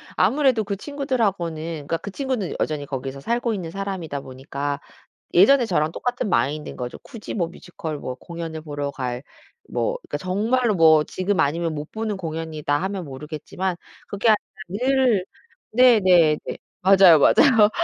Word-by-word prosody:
아무래도 265 Hz, -6 st, +3 dB
그 200 Hz, 0 st, -3 dB
친구들하고는 200 Hz, -, -2 dB, 0.2 s
그러니까 165 Hz, -, 0 dB
그 200 Hz, -, -8 dB
친구는 255 Hz, -3 st, -3 dB
여전히 150 Hz, -2 st, -1 dB
거기서 135 Hz, 0 st, -5 dB
살고 235 Hz, -, -1 dB
있는 180 Hz, -5 st, -4 dB
사람이다 185 Hz, -6 st, -4 dB
보니까 140 Hz, +2 st, -5 dB, 0.5 s
예전에 245 Hz, +8 st, +6 dB
저랑 160 Hz, -6 st, 0 dB
똑같은 245 Hz, +2 st, -2 dB
마인드인 150 Hz, -2 st, 0 dB
거죠. 125 Hz, 0 st, -6 dB
굳이 230 Hz, -6 st, -9 dB
뭐 175 Hz, -6 st, 0 dB
뮤지컬 170 Hz, -2 st, -7 dB
뭐 130 Hz, -, -5 dB
공연을 165 Hz, +2 st, -7 dB
보러 145 Hz, -2 st, -4 dB
갈 125 Hz, -2 st, -4 dB, 0.5 s
뭐 -, -, -1 dB
그러니까 -, -, -3 dB
정말로 215 Hz, +5 st, +1 dB
뭐 160 Hz, -3 st, +6 dB
'지금 185 Hz, +3 st, -1 dB
아니면 160 Hz, +2 st, 0 dB
못 150 Hz, +1 st, -6 dB
보는 220 Hz, -1 st, -3 dB
공연이다.' 160 Hz, -4 st, -4 dB
하면 190 Hz, -1 st, -3 dB
모르겠지만 155 Hz, +6 st, -5 dB, 0.3 s
그게 205 Hz, +3 st, 0 dB
아니라 215 Hz, -, +7 dB, 0.3 s
늘 250 Hz, -1 st, +2 dB, 0.5 s
네 245 Hz, -1 st, +6 dB
네 170 Hz, -5 st, +5 dB
네. -, -, -5 dB, 0.2 s
맞아요, 185 Hz, -4 st, +7 dB
맞아요. 225 Hz, -, +6 dB
180 Hz, 355 characters per minute, -23 LUFS, 155-220 Hz, 0.5 s, 아니라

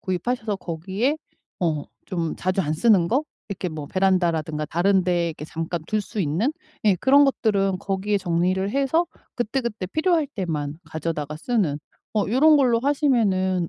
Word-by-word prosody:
구입하셔서 210 Hz, +3 st, -2 dB
거기에 190 Hz, -, -2 dB, 0.4 s
어 155 Hz, -4 st, 0 dB, 0.2 s
좀 170 Hz, -3 st, -2 dB
자주 185 Hz, +1 st, 0 dB
안 155 Hz, -2 st, -1 dB
쓰는 190 Hz, -3 st, +4 dB
거 275 Hz, +5 st, +1 dB, 0.2 s
이렇게 190 Hz, -3 st, -4 dB
뭐 150 Hz, -2 st, -6 dB
베란다라든가 170 Hz, -5 st, +1 dB
다른 185 Hz, +2 st, +2 dB
데 175 Hz, -2 st, +1 dB
이렇게 155 Hz, -1 st, -7 dB
잠깐 165 Hz, +2 st, -3 dB
둘 215 Hz, -1 st, 0 dB
수 205 Hz, -, -5 dB
있는 180 Hz, -, 0 dB, 0.3 s
예 205 Hz, -3 st, +5 dB
그런 275 Hz, +8 st, +5 dB
것들은 200 Hz, -8 st, +1 dB
거기에 200 Hz, +1 st, -1 dB
정리를 180 Hz, +2 st, 0 dB
해서 280 Hz, +5 st, +2 dB, 0.3 s
그때그때 235 Hz, -4 st, -2 dB
필요할 315 Hz, -, +1 dB
때만 155 Hz, -, -3 dB
가져다가 155 Hz, -2 st, -4 dB
쓰는 180 Hz, -, 0 dB, 0.3 s
어 210 Hz, -2 st, +1 dB
요런 295 Hz, +7 st, +5 dB
걸로 245 Hz, -4 st, +4 dB
하시면은 215 Hz, -, +1 dB
190 Hz, 335 characters per minute, -23 LUFS, 170-235 Hz, 0.4 s, 예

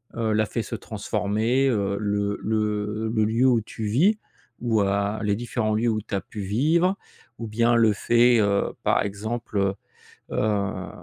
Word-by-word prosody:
heu, 110 Hz, -2 st, 0 dB
l'a 110 Hz, 0 st, +2 dB
fait -, -, -3 dB
se -, -, -5 dB
transformer, 115 Hz, +7 st, -1 dB
heu? 100 Hz, -4 st, 0 dB
Le 100 Hz, -1 st, -1 dB
le 105 Hz, 0 st, -1 dB
le 110 Hz, -2 st, +2 dB
lieu 115 Hz, +4 st, +2 dB
où 120 Hz, -3 st, +3 dB
tu 110 Hz, +1 st, -7 dB
vis 170 Hz, -, +3 dB, 0.4 s
ou, 115 Hz, -3 st, +1 dB
heu, 100 Hz, +2 st, 0 dB
les 105 Hz, -1 st, +1 dB
différents 115 Hz, -2 st, -1 dB
lieux 115 Hz, +2 st, +1 dB
où 110 Hz, -1 st, 0 dB
tu -, -, -12 dB
as 95 Hz, -, -1 dB
pu 105 Hz, -, -8 dB
vivre? 160 Hz, -, +1 dB, 0.4 s
Ou 115 Hz, -, -5 dB
bien 115 Hz, +2 st, +2 dB
le 115 Hz, -2 st, +4 dB
fait, 120 Hz, +3 st, +4 dB
heu, 100 Hz, -1 st, +1 dB
par -, -, +2 dB
exemple, 110 Hz, +3 st, -4 dB
heu, 100 Hz, 0 st, +1 dB, 0.6 s
heu, 105 Hz, -2 st, -1 dB
110 Hz, 175 wpm, -24 LUFS, 105-120 Hz, 0.6 s, le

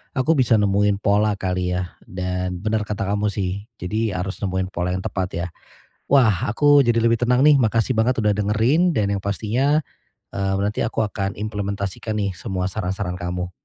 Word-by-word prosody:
aku 135 Hz, +4 st, +2 dB
bisa 130 Hz, -7 st, +3 dB
nemuin 105 Hz, -1 st, +2 dB
pola 105 Hz, +1 st, +2 dB
kali 90 Hz, -2 st, -2 dB
ya. 90 Hz, 0 st, -3 dB, 0.2 s
Dan 90 Hz, 0 st, -3 dB
benar 105 Hz, -1 st, -1 dB
kata 105 Hz, -1 st, -2 dB
kamu 100 Hz, +2 st, 0 dB
sih 100 Hz, 0 st, -3 dB
jadi 105 Hz, +3 st, -2 dB
harus 95 Hz, +2 st, -4 dB
nemuin 95 Hz, -1 st, -2 dB
pola 90 Hz, +1 st, -2 dB
yang 95 Hz, -, -4 dB
tepat 95 Hz, -2 st, -2 dB
ya. 85 Hz, +1 st, -2 dB, 0.7 s
Wah, 110 Hz, -10 st, +4 dB
aku 145 Hz, +5 st, +4 dB
jadi 115 Hz, -1 st, +2 dB
lebih 115 Hz, 0 st, +3 dB
tenang 125 Hz, +1 st, +3 dB
nih. 150 Hz, +1 st, +6 dB
Makasih 115 Hz, 0 st, +1 dB
banget 115 Hz, +1 st, +2 dB
udah 105 Hz, -1 st, +2 dB
dengerin 115 Hz, -, +2 dB
dan 105 Hz, -8 st, +1 dB
yang 95 Hz, -, -5 dB
pastinya, 120 Hz, +9 st, +1 dB, 0.5 s
eee, 95 Hz, 0 st, -1 dB
nanti 105 Hz, +1 st, -2 dB
aku 110 Hz, -, -1 dB
akan 100 Hz, -2 st, -3 dB
implementasikan 100 Hz, 0 st, -4 dB
nih 100 Hz, -2 st, 0 dB
semua 95 Hz, -1 st, -3 dB
saran-saran 95 Hz, -2 st, -3 dB
kamu. 90 Hz, +1 st, -4 dB
100 Hz, 175 wpm, -22 LUFS, 95-110 Hz, 0.7 s, nih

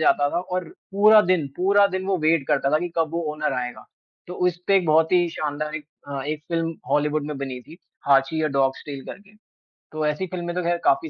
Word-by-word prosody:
जाता 145 Hz, -2 st, +3 dB
था, 175 Hz, -, -1 dB
और 180 Hz, 0 st, -3 dB, 0.3 s
पूरा 210 Hz, +2 st, +7 dB
दिन, 170 Hz, -6 st, +2 dB
पूरा 200 Hz, +2 st, +4 dB
दिन 185 Hz, 0 st, -4 dB
वो 195 Hz, -1 st, +1 dB
वेट 160 Hz, -4 st, +2 dB
करता 140 Hz, -2 st, +2 dB
था 155 Hz, -, +4 dB
कि 175 Hz, +2 st, -3 dB
कब 165 Hz, -2 st, +1 dB
वो 170 Hz, -, 0 dB
ओनर 150 Hz, -2 st, -1 dB
आएगा। 125 Hz, 0 st, -7 dB, 0.4 s
तो 180 Hz, -, -7 dB
उसपे 180 Hz, +2 st, +1 dB
एक 185 Hz, -3 st, +1 dB
बहुत 160 Hz, +2 st, +3 dB
ही 175 Hz, -1 st, +4 dB
शानदार 150 Hz, 0 st, -3 dB
एक 150 Hz, -2 st, -9 dB, 0.2 s
अ, 140 Hz, -1 st, -4 dB
एक 155 Hz, 0 st, -3 dB
फ़िल्म 165 Hz, -1 st, -1 dB, 0.2 s
हॉलीवुड 150 Hz, 0 st, +1 dB
में 150 Hz, -1 st, -4 dB
बनी 135 Hz, -2 st, -5 dB
थी, 160 Hz, +6 st, -15 dB, 0.3 s
हाँची 140 Hz, +3 st, +3 dB
या 155 Hz, -, +1 dB
डॉग 135 Hz, -1 st, +2 dB
स्टेल 140 Hz, -2 st, -8 dB
करके। 205 Hz, +1 st, -11 dB, 0.6 s
तो 155 Hz, 0 st, -2 dB
ऐसी 150 Hz, +5 st, -1 dB
फ़िल्में 175 Hz, -1 st, -5 dB
तो 180 Hz, -, 0 dB
ख़ैर 175 Hz, 0 st, +1 dB
काफ़ी 340 Hz, -2 st, +2 dB
160 Hz, 220 wpm, -23 LUFS, 150-180 Hz, 0.6 s, पूरा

